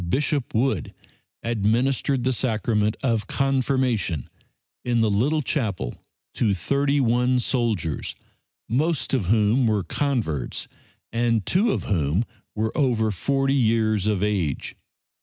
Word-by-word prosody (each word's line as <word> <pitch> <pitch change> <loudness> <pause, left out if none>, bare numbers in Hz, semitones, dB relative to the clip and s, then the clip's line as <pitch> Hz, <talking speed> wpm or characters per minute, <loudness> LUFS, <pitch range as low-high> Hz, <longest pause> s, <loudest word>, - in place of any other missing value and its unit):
Bishop 140 - 0
Wood 115 - 0 0.5
administered 120 +4 +1
the 130 +1 +1
sacrament 110 -3 0
of 115 -6 0
Confirmation 130 - 0 0.6
in 120 -2 +1
the 110 -2 +2
little 145 +10 +1
chapel 100 - -2 0.4
to 105 -5 +1
thirty 140 - +1
one 125 0 +2
soldiers, 110 - -1 0.5
most 150 +7 0
of 115 -10 +1
whom 110 +4 +3
were 105 -3 +1
converts 110 - -2 0.4
and 115 -3 +1
two 205 - +2
of - - -1
whom 85 +3 0 0.3
were 110 +1 -1
over 120 -7 +2
40 135 +7 0
years 110 -5 +2
of 105 -2 +1
age. 95 -9 -1
115 Hz, 120 wpm, -24 LUFS, 105-135 Hz, 0.6 s, whom